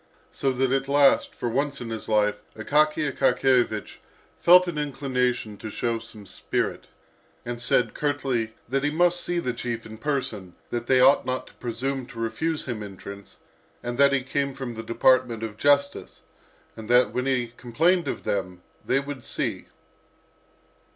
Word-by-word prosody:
So 135 - 0
that 130 0 0
at 135 0 0
last, 140 0 +4
for - - -3
once 140 +4 -1
in 115 -2 -6
his 110 -1 -5
life, 105 -1 +2 0.2
Akaky 150 +5 +2
Akakiyevich 125 -5 +1 0.4
felt 180 +1 +7
an 160 -4 -3
inclination 125 -6 -1
to 110 - -7
show 115 +2 -2
some 110 -2 -13
spirit, 95 - -3 0.6
and 120 0 -5
said 120 -2 +2
curtly 130 -6 -1
that 135 +3 -1
he 145 - +2
must 175 +3 +2
see 175 - -2
the 130 -8 -1
chief 120 -1 -4
in 110 0 -10
person, 115 -11 -3 0.2
that 120 0 -3
they 130 -1 +4
ought 135 +3 +6
not 130 0 -2
to - - -17
presume 130 +2 -3
to 120 -3 -10
refuse 150 +8 -2
him 120 -5 -4
entrance, 100 0 -10 0.5
that 135 +4 +3
he 135 -2 +1
came 140 +1 -2
from 135 -3 -5
the 115 - -6
department 115 0 +2
of 110 -2 -5
justice, 140 +2 +1 0.5
and 110 -1 -9
that 125 +1 +5
when 125 +1 -1
he 125 -3 0
complained 165 +9 +1
of - - -4
them, 90 -3 -3 0.2
they 130 - +2
would 140 -2 -7
see. - - -3
125 Hz, 165 wpm, -25 LUFS, 115-140 Hz, 0.6 s, felt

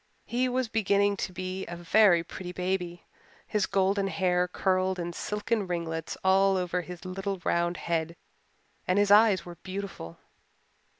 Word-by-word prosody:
He 250 +2 0
was 255 0 0
beginning 205 -2 +2
to - - -3
be 185 +1 -4
a 175 - -6
very 175 0 +4
pretty 180 +1 -7
baby; 180 -1 -3 0.4
his 210 -3 0
golden 195 +1 +1
hair 180 -2 +1
curled 185 +1 0
in 175 -1 -4
silken 210 +2 -2
ringlets 165 -2 -3
all 195 +1 +4
over 180 0 -1
his 180 0 -10
little 195 +1 -3
round 175 0 +1
head 165 0 -2 0.7
and 185 - +2
his 205 0 +3
eyes 205 -4 +6
were 175 -1 -9
beautiful. 190 - -6
185 Hz, 145 wpm, -28 LUFS, 175-200 Hz, 0.7 s, eyes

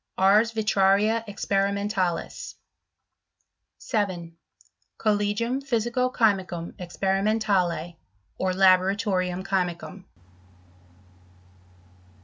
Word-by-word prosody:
Ars 210 +4 +4
Vitraria 210 +1 +2
experimentalis. 200 -2 -2 1.2
7. 185 -7 -3 0.6
Collegium 215 +4 0
Phvsico 250 -1 0
chymicum 190 -8 0
experimentale, 190 -2 0 0.4
or 185 - 0
Laboratorium 185 0 +2
chymicum. 185 0 -3
195 Hz, 55 wpm, -25 LUFS, 185-215 Hz, 1.2 s, Ars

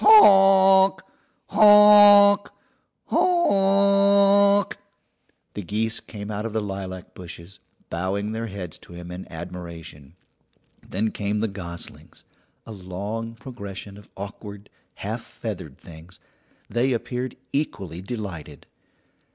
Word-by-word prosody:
"Honk! 195 - +6 0.5
honk! 205 -1 +7 0.6
honk!" 200 - +3 0.8
The 105 - -6
geese 110 +4 -2
came 105 -1 -9
out 105 0 -4
of 115 -1 -5
the 110 - 0
lilac 95 -2 -7
bushes, 85 +1 -11 0.3
bowing 95 +4 -3
their 115 +1 -4
heads 95 -5 -8
to - - -16
him 85 0 -10
in 90 +1 -9
admiration. 85 -3 -10 0.7
Then 110 +3 -3
came 105 0 -3
the 110 - -1
goslings 85 -4 -10 0.4
a - - -10
long 105 +4 -6
procession 100 -5 -9
of 105 0 -16
awkward, 100 +1 -10 0.2
half - - -5
feathered - - -8
things; 85 +2 -15 0.5
they 125 +4 0
appeared 125 +2 -4 0.2
equally 100 - -4
delighted. 95 - -8
105 Hz, 105 wpm, -23 LUFS, -, 0.8 s, honk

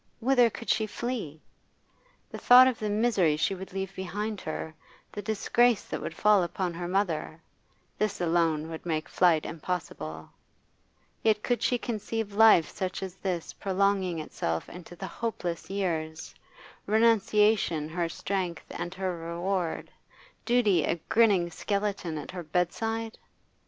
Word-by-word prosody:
whither 245 0 +4
could 230 - -9
she 220 0 +1
flee? 215 - -4 0.9
The - - -6
thought 250 +1 +8
of 255 -3 -1
the 215 - -2
misery 205 -8 +2
she 165 +5 +1
would 190 0 -8
leave 195 0 -4
behind 205 +3 -4
her, 155 0 -5 0.4
the 205 - -5
disgrace 225 +2 +2
that - - -5
would - - -5
fall 210 -2 +4
upon 175 +1 -2
her 175 +1 -5
mother 175 -4 -1 0.6
this 210 -1 0
would 175 - 0
alone 160 -1 +1
make 155 -2 -2
flight 170 -4 +3
impossible. 155 - -5 0.9
Yet 215 -1 +2
could 245 -1 0
she 245 - +2
conceive 220 -2 -4
life 215 -6 +6
such 185 0 -4
as 190 -2 -5
this 180 -4 -3
prolonging 195 -2 0
itself 85 - -3
into 175 0 -11
the 190 - -6
hopeless 180 -3 -4
years, 165 -5 -3 0.5
renunciation 210 -6 +3
her 170 0 -2
strength 185 -1 -3
and 175 +2 -5
her 185 -1 -2
reward, 170 +1 -3 0.5
duty 215 -9 +3
a 165 - +1
grinning 200 -7 +4
skeleton 200 -2 -2
at 150 - -7
her 180 - -6
bedside? 220 +8 -2
190 Hz, 140 wpm, -28 LUFS, 170-215 Hz, 0.9 s, thought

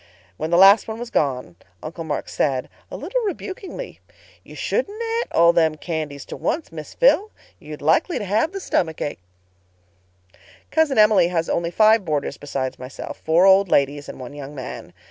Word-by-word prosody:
When 155 - -4
the 170 - +3
last 195 +3 +7
one 220 0 -5
was 240 0 -7
gone, 125 - -1 0.3
Uncle 165 +2 -6
Mark 160 - -4
said, 130 -3 -1 0.2
a - - -7
little - - -2
rebukingly, 400 +3 -6 0.4
'Ye - - -13
shouldn't 430 -3 -2
a'et 465 +1 -2
all 170 +1 +5
them 160 -2 +2
candies 155 -3 -5
to - - -8
onct, 320 - -2
Miss - - -9
Phil. 465 -4 +4 0.3
You'll - - -10
likely 355 - +2
have 215 - 0
the 390 - -5
stummick 160 - -1
ache.' 145 - -4 1.5
"Cousin 315 -4 +2
Emily 210 -4 +5
has 165 -2 -1
only 170 0 0
five 215 +3 +4
boarders 150 -4 -2
besides 135 -2 -4
myself—four 160 +6 -1
old 195 0 +5
ladies 145 0 +1
and - - -9
one 130 +2 -8
young 145 0 -9
man. 130 -2 -8
170 Hz, 165 wpm, -22 LUFS, 145-245 Hz, 1.5 s, last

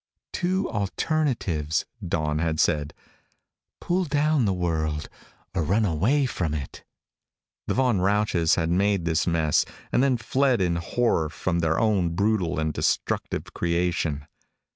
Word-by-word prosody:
"Two 185 +2 0
alternatives," 100 - -1 0.2
Dawn 75 -3 -1
had 80 -1 -1
said. 75 -3 +1 0.8
"Pull 180 +1 0
down 150 -2 +2
the 100 - +2
world 80 -4 -1 0.5
or - - 0
run 100 +8 +2
away 105 - +2
from 85 - -2
it." 70 -3 -7 0.8
The - - 0
Von 125 -6 +2
Rausches 100 -4 +2
had 80 -1 0
made 100 0 +1
this 80 0 +1
mess 80 -3 +2 0.3
and - - +3
then 135 -2 +3
fled 130 +2 +1
in 90 -2 +1
horror 85 -2 0
from 85 +2 -2
their 80 -1 +1
own 95 -7 +1
brutal 100 -4 +1
and 80 -1 -1
destructive - - -1
creation. 85 -4 -1
90 Hz, 135 wpm, -25 LUFS, 80-115 Hz, 0.8 s, and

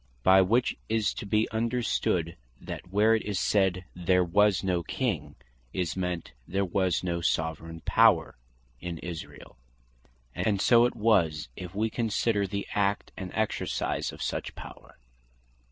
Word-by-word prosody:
By 95 +5 +7
which 115 +7 +2
is 110 -2 +1
to - - -7
bee 110 +2 +2
understood, 110 -7 0 0.2
that 90 - -8
where 105 +3 +4
it 110 - +2
is 100 -3 -2
said, 95 -2 +1
"there 90 +1 +2
was 100 +2 +3
no 90 -2 +1
King," 80 - -3 0.4
is 90 -4 -2
meant, 90 -6 -3 0.2
"there 95 +2 0
was 95 -1 0
no 85 -1 -2
Soveraign 80 0 -2
Power" - - +4 0.4
in 85 +2 -5
Israel. 80 -5 -8 0.8
And 105 -3 0
so 120 +3 +5
it 120 - -1
was, 85 - +2
if 90 0 -8
we 110 +2 0
consider 110 -3 0
the 100 +1 -3
Act, 100 0 0
and 95 -3 -6
Exercise 110 -1 -1
of - - -7
such - - -3
power. - - -12
95 Hz, 145 wpm, -28 LUFS, 85-105 Hz, 0.8 s, By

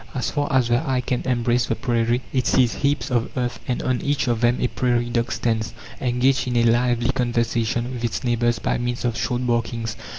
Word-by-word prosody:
As 125 - -1
far 145 -2 -1
as 130 -3 +3
the 120 0 +3
eye 130 -1 +1
can 125 0 -2
embrace 120 -1 +1
the - - 0
prairie, 120 +1 0
it 130 -2 +1
sees 125 -3 +3
heaps 140 -2 -1
of 120 -1 +1
earth, 125 -1 -2
and 125 - -1
on 130 -1 0
each 145 -1 0
of 120 -2 0
them 120 +1 +3
a - - +1
prairie 120 -1 0
dog 120 0 0
stands, 115 0 -1 0.3
engaged 130 +1 +2
in 125 -1 0
a 120 - +4
lively 120 +1 +2
conversation 120 -1 0
with 120 -1 -6
its 115 - -2
neighbours 120 -1 +1
by - - -1
means 120 0 -2
of 120 -2 0
short 120 +3 -1
barkings. 115 -1 -1
120 Hz, 210 wpm, -22 LUFS, 120-125 Hz, 0.3 s, a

